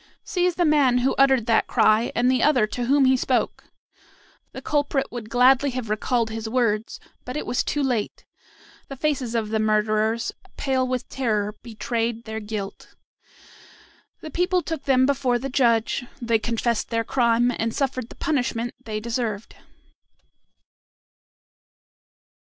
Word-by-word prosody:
Seize 360 Hz, -2 st, 0 dB
the 350 Hz, -, +2 dB
man 285 Hz, -5 st, +4 dB
who 270 Hz, -, +2 dB
uttered 265 Hz, -4 st, +4 dB
that 225 Hz, -2 st, +2 dB
cry 220 Hz, 0 st, +3 dB
and 245 Hz, -, +2 dB
the 255 Hz, -2 st, +1 dB
other 265 Hz, -7 st, +4 dB
to 240 Hz, +3 st, -4 dB
whom 275 Hz, +2 st, +4 dB
he 260 Hz, 0 st, +5 dB
spoke!" 255 Hz, -, -1 dB, 0.9 s
The -, -, -8 dB
culprit 285 Hz, -2 st, -1 dB
would 235 Hz, -3 st, -7 dB
gladly 255 Hz, +3 st, +4 dB
have 225 Hz, -4 st, -4 dB
recalled 225 Hz, +1 st, 0 dB
his 220 Hz, 0 st, -5 dB
words, 225 Hz, -3 st, 0 dB, 0.2 s
but 250 Hz, +4 st, -5 dB
it -, -, -4 dB
was 245 Hz, -, 0 dB
too 290 Hz, -, -1 dB
late. 245 Hz, -6 st, -2 dB, 0.6 s
The 275 Hz, -, -7 dB
faces 265 Hz, -4 st, -1 dB
of 220 Hz, -2 st, -1 dB
the 220 Hz, 0 st, 0 dB
murderers, 215 Hz, +1 st, +1 dB, 0.3 s
pale 260 Hz, -2 st, 0 dB
with 255 Hz, -1 st, -3 dB
terror, 210 Hz, -5 st, -1 dB
betrayed 230 Hz, 0 st, -3 dB
their 220 Hz, -1 st, -5 dB
guilt. 210 Hz, -2 st, -7 dB, 1.3 s
The 310 Hz, -, -8 dB
people 360 Hz, +2 st, +1 dB
took 320 Hz, -2 st, -5 dB
them 260 Hz, -1 st, +4 dB
before 265 Hz, -3 st, +1 dB
the 270 Hz, +3 st, -5 dB
judge, 240 Hz, -1 st, +1 dB
they 230 Hz, -3 st, +1 dB
confessed 235 Hz, 0 st, -1 dB
their 230 Hz, -1 st, 0 dB
crime, 240 Hz, 0 st, +2 dB
and 225 Hz, 0 st, 0 dB
suffered 255 Hz, -2 st, -2 dB
the -, -, -12 dB
punishment 245 Hz, -5 st, -1 dB
they 215 Hz, -1 st, -4 dB
deserved. 225 Hz, -2 st, -3 dB
240 Hz, 145 wpm, -23 LUFS, 225-270 Hz, 1.3 s, he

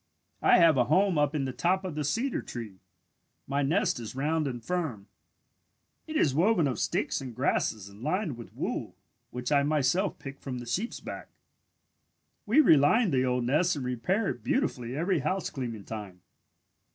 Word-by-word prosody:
"I -, -, +6 dB
have 165 Hz, -5 st, +6 dB
a 125 Hz, -, +4 dB
home 185 Hz, +2 st, +3 dB
up 145 Hz, +1 st, +1 dB
in 140 Hz, -3 st, 0 dB
the 130 Hz, -, -3 dB
top 185 Hz, +5 st, +1 dB
of 180 Hz, -, -4 dB
the 150 Hz, 0 st, -2 dB
cedar 230 Hz, -, -1 dB
tree. 110 Hz, -6 st, -8 dB, 0.7 s
My 140 Hz, +1 st, -1 dB
nest 150 Hz, 0 st, +1 dB
is 115 Hz, 0 st, -7 dB
round 155 Hz, +3 st, 0 dB
and 120 Hz, -3 st, -5 dB
firm. 160 Hz, -, -2 dB, 1.0 s
It 315 Hz, -, -6 dB
is 140 Hz, -, +3 dB
woven 175 Hz, +2 st, +3 dB
of 125 Hz, -5 st, -2 dB
sticks -, -, -1 dB
and 125 Hz, -4 st, -7 dB
grasses 105 Hz, -2 st, 0 dB
and 100 Hz, +2 st, -14 dB
lined 160 Hz, -, -1 dB
with 115 Hz, -1 st, -11 dB
wool -, -, -3 dB, 0.3 s
which 125 Hz, +2 st, -5 dB
I 145 Hz, -1 st, +5 dB
myself 150 Hz, +6 st, +1 dB
pick 135 Hz, 0 st, -9 dB
from 130 Hz, -2 st, -5 dB
the 120 Hz, -, -7 dB
sheep's 190 Hz, -, -2 dB
back. -, -, -8 dB, 1.2 s
"We 255 Hz, +9 st, +6 dB
reline 165 Hz, -, +5 dB
the 130 Hz, -2 st, +2 dB
old 125 Hz, -1 st, 0 dB
nest 155 Hz, +8 st, +2 dB
and 135 Hz, -3 st, -4 dB
repair 150 Hz, -, 0 dB
it -, -, -5 dB
beautifully 130 Hz, -, -1 dB
every 175 Hz, +2 st, +1 dB
housecleaning 130 Hz, -, -3 dB
time. 100 Hz, -5 st, -8 dB
145 Hz, 175 wpm, -29 LUFS, 125-180 Hz, 1.2 s, I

